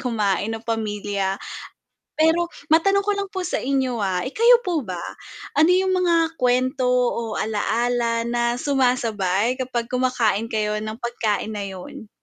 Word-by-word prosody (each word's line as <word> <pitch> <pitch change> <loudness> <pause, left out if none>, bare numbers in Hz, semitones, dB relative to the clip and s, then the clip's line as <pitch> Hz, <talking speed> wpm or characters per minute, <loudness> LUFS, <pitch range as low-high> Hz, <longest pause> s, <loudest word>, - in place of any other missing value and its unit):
kumain 215 -4 0
ng 225 - -12
pamilya. 205 -3 -2 0.8
Pero 325 +2 +3 0.2
matanong 395 +5 +4
ko 415 - +1
lang 400 -1 -2
po 375 -1 -4
sa 360 - -1
inyo, 260 -3 -1
ah, 190 -3 0
eh 260 - -4
kayo 475 +4 +5
po 350 -5 0
ba, 180 -2 -4 0.5
ano 315 +5 +4
yung 375 +1 +3
mga 335 -2 +2
kwento 255 +1 +1
o 240 -3 0
alaala 230 +2 0
na 240 0 -1
sumasabay 245 -5 +1
kapag 245 -2 -3
kumakain 240 -4 +1
kayo 210 -1 -1
ng 215 0 -5
pagkain 220 -3 -2
na 205 -1 -4
yun? 190 +3 -9
240 Hz, 145 wpm, -22 LUFS, 215-280 Hz, 0.8 s, kayo